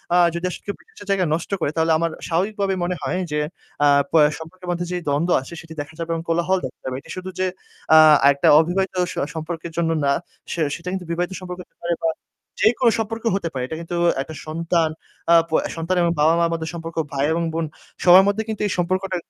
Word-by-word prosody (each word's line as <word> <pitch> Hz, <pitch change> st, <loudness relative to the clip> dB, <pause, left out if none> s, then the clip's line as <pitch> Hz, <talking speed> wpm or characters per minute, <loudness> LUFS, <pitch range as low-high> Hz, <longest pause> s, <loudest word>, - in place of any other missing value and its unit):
আ -, -, +6 dB, 0.2 s
যদি 170 Hz, +2 st, -3 dB
আসলে -, -, -7 dB
কেও 200 Hz, -, -3 dB
বিশ্বাসের 440 Hz, -, -15 dB
জায়গা 190 Hz, -2 st, +2 dB
নষ্ট 165 Hz, +5 st, -3 dB
করে 145 Hz, -, 0 dB
তাহলে 160 Hz, 0 st, +2 dB
আমার 165 Hz, +1 st, 0 dB, 0.2 s
স্বাভাবিক 185 Hz, +6 st, 0 dB
ভাবেই 195 Hz, -1 st, +1 dB
মনে 180 Hz, +1 st, -1 dB
হয় 185 Hz, -, -1 dB
যে 150 Hz, -, 0 dB, 0.5 s
আ -, -, +6 dB, 0.2 s
প -, -, -37 dB, 0.2 s
সম্পর্কের 180 Hz, +3 st, -11 dB
মধ্যে 175 Hz, 0 st, -2 dB
যেই 180 Hz, -1 st, -2 dB
দ্বন্দ্ব 160 Hz, +5 st, +1 dB
আছে 135 Hz, -, -11 dB
সেটি 160 Hz, -1 st, -11 dB
দেখা 145 Hz, +2 st, -9 dB
যাবে 165 Hz, 0 st, -4 dB
এবং 165 Hz, -, -2 dB
কোলাহল 170 Hz, +3 st, +2 dB
দেখা 130 Hz, -, -8 dB
যাবে। 130 Hz, -1 st, -3 dB
এটি -, -, -18 dB
শুধু 185 Hz, +1 st, -5 dB
যে 185 Hz, -, +2 dB, 0.5 s
আ -, -, +10 dB, 0.3 s
একটা 140 Hz, -, +1 dB
অবিবাহিত 185 Hz, +3 st, 0 dB, 0.2 s
স -, -, -6 dB, 0.2 s
সম্পর্কের 165 Hz, +1 st, -5 dB
জন্য 170 Hz, -1 st, +1 dB, 0.2 s
না, 140 Hz, -, +3 dB, 0.4 s
সে 170 Hz, -, -2 dB
সেটা 170 Hz, +1 st, -11 dB
কিন্তু 190 Hz, -2 st, -4 dB
বিবাহিত 175 Hz, +2 st, -1 dB
সম্পর্ক 180 Hz, -1 st, -7 dB
হতে -, -, -47 dB
পারে 170 Hz, 0 st, 0 dB
বা 165 Hz, -, +3 dB, 0.5 s
যেইকোনো 235 Hz, +1 st, +4 dB
সম্পর্ক 225 Hz, +1 st, -3 dB
হতে 170 Hz, -4 st, -2 dB
পারে। 130 Hz, -2 st, -2 dB
এটা 160 Hz, -, -5 dB
কিন্তু 170 Hz, +1 st, -5 dB, 0.3 s
একটা 155 Hz, +2 st, -7 dB
সন্তান 165 Hz, +1 st, 0 dB, 0.4 s
আ -, -, +8 dB
প -, -, -23 dB, 0.2 s
সন্তান 165 Hz, +3 st, -1 dB
এবং 170 Hz, -, +2 dB
বাবা-মা 165 Hz, +3 st, +4 dB
মধ্যে 160 Hz, -1 st, -3 dB
সম্পর্ক, 165 Hz, 0 st, -7 dB, 0.2 s
ভাই 140 Hz, +1 st, +1 dB
এবং 170 Hz, +1 st, 0 dB
বোন 165 Hz, 0 st, -1 dB, 0.4 s
সবার 185 Hz, +2 st, +9 dB
মধ্যে 205 Hz, +2 st, +1 dB
কিন্তু 215 Hz, -, -3 dB
এই 200 Hz, -, -3 dB
সম্পর্কটা 185 Hz, +2 st, 0 dB
170 Hz, 220 wpm, -22 LUFS, 165-185 Hz, 0.5 s, আ